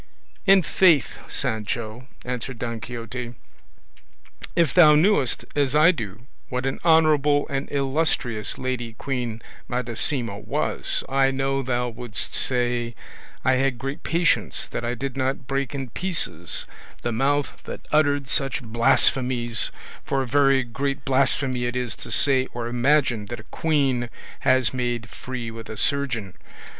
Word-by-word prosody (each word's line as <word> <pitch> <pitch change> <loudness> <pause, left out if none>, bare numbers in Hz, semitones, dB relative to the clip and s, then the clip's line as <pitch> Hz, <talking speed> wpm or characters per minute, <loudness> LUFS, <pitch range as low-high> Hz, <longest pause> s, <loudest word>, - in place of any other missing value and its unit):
"In 195 -1 +7
faith, 165 -4 +4
Sancho," 110 +2 -3 0.2
answered 125 0 -4
Don 115 -1 -4
Quixote, 120 +1 -6 1.2
"if 165 -7 +3
thou 155 -4 +8
knewest 150 - +2
as 145 -1 +1
I 155 +4 +7
do 110 - -7 0.2
what 125 0 -2
an 135 - -2
honourable 150 -3 +4
and 135 0 -3
illustrious 135 -6 -1
lady 125 -3 -3
Queen 120 -2 -4 0.2
Madasima 120 -2 -1
was, - - 0
I 135 0 +3
know 135 0 0
thou 125 -1 -1
wouldst 120 -1 -3
say 120 -2 0 0.5
I 130 0 +4
had 135 -1 +1
great 135 +4 -5
patience 170 0 +1
that - - -4
I 120 +1 -1
did 135 +2 -4
not 130 -1 -1
break 135 +2 -2
in 135 -4 -5
pieces 100 - -1 0.4
the 120 - -1
mouth 140 +5 0
that - - -8
uttered 145 -2 +2
such 135 -1 0
blasphemies, 120 0 +2 0.3
for 135 -1 0
a - - -6
very 135 0 +4
great 140 +4 -3
blasphemy 130 -2 +1
it 120 +1 -2
is 125 -3 -2
to - - -8
say 130 -2 +3
or 120 -1 -3
imagine 120 -2 +1
that 120 +2 -6
a - - -25
queen 135 -6 +1 0.3
has 130 -4 +3
made 120 -2 -2
free 125 -3 -6
with 115 -1 -9
a 110 - -6
surgeon. 120 -9 -1
130 Hz, 140 wpm, -24 LUFS, 120-140 Hz, 1.2 s, thou